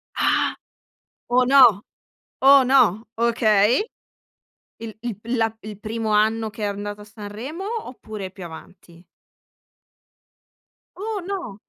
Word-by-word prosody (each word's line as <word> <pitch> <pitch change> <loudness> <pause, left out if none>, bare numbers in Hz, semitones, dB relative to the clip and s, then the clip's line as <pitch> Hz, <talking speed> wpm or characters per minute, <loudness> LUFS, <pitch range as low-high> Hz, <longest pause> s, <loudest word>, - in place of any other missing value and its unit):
Ah! - - +1 0.7
Oh, 250 +1 +3
no! 250 -6 +6 0.6
Oh, 275 0 +7
no! 240 -5 +3
Okay. 230 - +3 1.0
Il 225 -3 -7
il 235 -5 -4
pil 235 +3 -3
la 225 -1 0
il 210 -1 -9
primo 220 0 -4
anno 220 +1 +2
che 210 0 -9
è - - +1
andato 205 +1 -5
a - - -11
Sanremo, 220 - -8 0.2
oppure 215 -6 -8
più 190 -1 -10
avanti? 170 +1 -13 1.9
Oh, 420 +1 -4
no! 355 - -5
220 Hz, 120 wpm, -22 LUFS, 205-250 Hz, 1.9 s, Oh